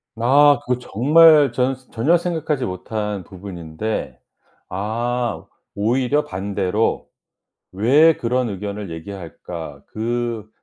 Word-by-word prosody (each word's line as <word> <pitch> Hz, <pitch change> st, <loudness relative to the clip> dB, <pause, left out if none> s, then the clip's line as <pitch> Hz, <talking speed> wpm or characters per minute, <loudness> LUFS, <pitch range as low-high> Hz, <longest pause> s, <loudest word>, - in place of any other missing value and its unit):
아 140 Hz, +5 st, +5 dB
그거 125 Hz, 0 st, 0 dB
정말 150 Hz, +5 st, +5 dB
저는 130 Hz, +1 st, 0 dB, 0.2 s
전혀 150 Hz, +10 st, +3 dB
생각하지 160 Hz, -6 st, -2 dB
못한 105 Hz, +1 st, -4 dB
부분인데 90 Hz, -, -6 dB, 0.5 s
아 115 Hz, +5 st, -2 dB, 0.3 s
오히려 125 Hz, +7 st, +1 dB
반대로 100 Hz, +2 st, -1 dB, 0.6 s
왜 140 Hz, +12 st, +4 dB
그런 125 Hz, 0 st, 0 dB
의견을 100 Hz, 0 st, -5 dB
얘기할까? 80 Hz, -4 st, -8 dB
"그 115 Hz, -1 st, -3 dB
110 Hz, 210 characters per minute, -21 LUFS, 95-130 Hz, 0.6 s, 아